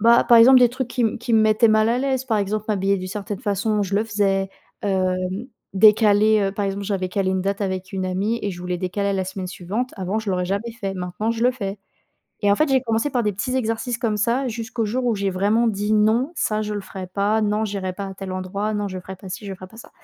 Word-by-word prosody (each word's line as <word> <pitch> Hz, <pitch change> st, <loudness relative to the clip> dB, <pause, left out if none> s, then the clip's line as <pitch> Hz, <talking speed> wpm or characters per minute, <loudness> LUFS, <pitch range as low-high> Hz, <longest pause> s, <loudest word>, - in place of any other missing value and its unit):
bah, 235 Hz, +2 st, +6 dB
par 235 Hz, -, +6 dB
exemple, 255 Hz, +3 st, +8 dB
des 245 Hz, -, +6 dB
trucs 255 Hz, 0 st, -4 dB
qui 250 Hz, -, -4 dB
m 225 Hz, -, +1 dB
qui 235 Hz, 0 st, -4 dB
me 220 Hz, -, +5 dB
mettaient 215 Hz, +2 st, +4 dB
mal 215 Hz, 0 st, +4 dB
à 240 Hz, -, +2 dB
l'aise, 265 Hz, -1 st, -1 dB
par 225 Hz, -4 st, +1 dB
exemple, 210 Hz, +1 st, -2 dB
m'habiller 200 Hz, -1 st, +1 dB
d'une 185 Hz, 0 st, -6 dB
certaine 205 Hz, +1 st, -5 dB
façon, 205 Hz, +1 st, 0 dB
je 195 Hz, 0 st, -3 dB
le 215 Hz, -, +1 dB
faisais, 195 Hz, -3 st, 0 dB, 0.3 s
hem, 185 Hz, -2 st, +1 dB, 0.6 s
décaler, 215 Hz, +1 st, +5 dB
heu, 195 Hz, -1 st, 0 dB
par 205 Hz, 0 st, -2 dB
exemple, 195 Hz, +1 st, -3 dB
j'avais 190 Hz, -2 st, -2 dB
calé 190 Hz, 0 st, 0 dB
une 190 Hz, 0 st, 0 dB
date 200 Hz, +1 st, -2 dB
avec 190 Hz, -1 st, -3 dB
une 190 Hz, -1 st, -2 dB
amie 200 Hz, +5 st, -1 dB
et 205 Hz, -, -1 dB
je 175 Hz, -2 st, -8 dB
voulais 180 Hz, 0 st, -3 dB
décaler 190 Hz, +3 st, -2 dB
à -, -, 0 dB
la 190 Hz, -1 st, -1 dB
semaine 190 Hz, 0 st, -5 dB
suivante, 200 Hz, +8 st, -4 dB
avant, 190 Hz, +2 st, -2 dB
je 220 Hz, -2 st, -5 dB
l'aurais 180 Hz, -1 st, 0 dB
jamais 200 Hz, +5 st, -2 dB
fait, 195 Hz, -2 st, -3 dB
maintenant, 185 Hz, +4 st, -3 dB
je 230 Hz, 0 st, -4 dB
le 250 Hz, -, +4 dB
fais 200 Hz, -5 st, -5 dB, 0.6 s
et 205 Hz, -, +3 dB
en -, -, +2 dB
fait, 310 Hz, -, +2 dB
j'ai 265 Hz, -1 st, +4 dB
commencé 225 Hz, +2 st, 0 dB
par 245 Hz, -3 st, 0 dB
des 210 Hz, -, +1 dB
petits 230 Hz, +7 st, -2 dB
exercices 235 Hz, 0 st, -1 dB
comme 220 Hz, -3 st, -1 dB
ça 235 Hz, +6 st, +1 dB
jusqu'au 230 Hz, 0 st, -3 dB
jour 250 Hz, +5 st, -2 dB
où 235 Hz, -, +2 dB
j'ai 195 Hz, 0 st, -1 dB
vraiment 205 Hz, +5 st, +2 dB
dit: 210 Hz, 0 st, -1 dB
«Non, 220 Hz, +8 st, +2 dB
ça, 215 Hz, -6 st, 0 dB
je 210 Hz, 0 st, -3 dB
le 205 Hz, -, -4 dB
ferai 190 Hz, -1 st, -8 dB
pas!», 205 Hz, +4 st, +1 dB
«Non, 210 Hz, +1 st, +1 dB
j'irai 195 Hz, -2 st, -3 dB
pas 200 Hz, +1 st, -5 dB
à -, -, -7 dB
tel 190 Hz, 0 st, -7 dB
endroit!», 195 Hz, +3 st, -3 dB
«Non, 205 Hz, -1 st, -2 dB
je 185 Hz, -1 st, -5 dB
ferai 190 Hz, +1 st, -9 dB
pas 190 Hz, +1 st, -11 dB
ci, 210 Hz, +3 st, -6 dB
je 195 Hz, -, -5 dB
ferai 185 Hz, 0 st, -11 dB
pas 225 Hz, -, -17 dB
ça». -, -, -12 dB
205 Hz, 265 wpm, -22 LUFS, 195-225 Hz, 0.6 s, exemple